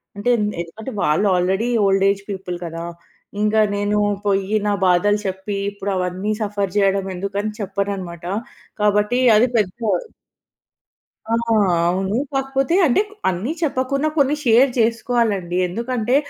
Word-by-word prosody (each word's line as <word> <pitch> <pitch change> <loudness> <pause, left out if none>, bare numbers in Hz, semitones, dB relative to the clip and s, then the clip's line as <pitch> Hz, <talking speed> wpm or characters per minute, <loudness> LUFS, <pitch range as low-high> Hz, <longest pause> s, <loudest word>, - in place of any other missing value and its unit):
అంటే 205 +4 -2
ఎం 210 - 0 0.2
ఎందుకంటే 215 +9 -8
వాళ్ళు 155 +8 +2
ఆల్రెడీ 190 +6 +1 0.2
ఓల్డ్ 195 0 +3
ఏజ్ 200 0 -1
పీపుల్ 190 -2 -4
కదా! 165 0 -6 0.6
ఇంకా 215 +1 +3
నేను 205 +1 0 0.3
పోయ్యి 200 +1 +1
నా 205 - +2
బాధలు 195 +4 +3
చెప్పి 190 +2 -3
ఇప్పుడు 200 0 -4
అవన్నీ 185 +3 -2
సఫర్ 200 -2 -2
చేయడం 195 -1 +2
ఎందుకని 200 +3 -3
చెప్పననమాట. 195 -4 -4 0.6
కాబట్టి 210 +3 +2 0.2
అది 245 +4 +4
పెద్ద 205 -4 +1 1.6
ఆ! - - +1 0.5
అవును. 190 +3 0 0.2
కాకపోతే 270 +3 0
అంటే 270 +7 +3 0.3
అన్నీ 190 - -2
చెప్పకున్నా 275 0 0
కొన్ని 285 +1 +3
షేర్ 245 +3 +5
చేసుకోవాలండి. 225 -6 0
ఎందుకంటే, 235 +4 -1
205 Hz, 125 wpm, -20 LUFS, 190-230 Hz, 1.6 s, షేర్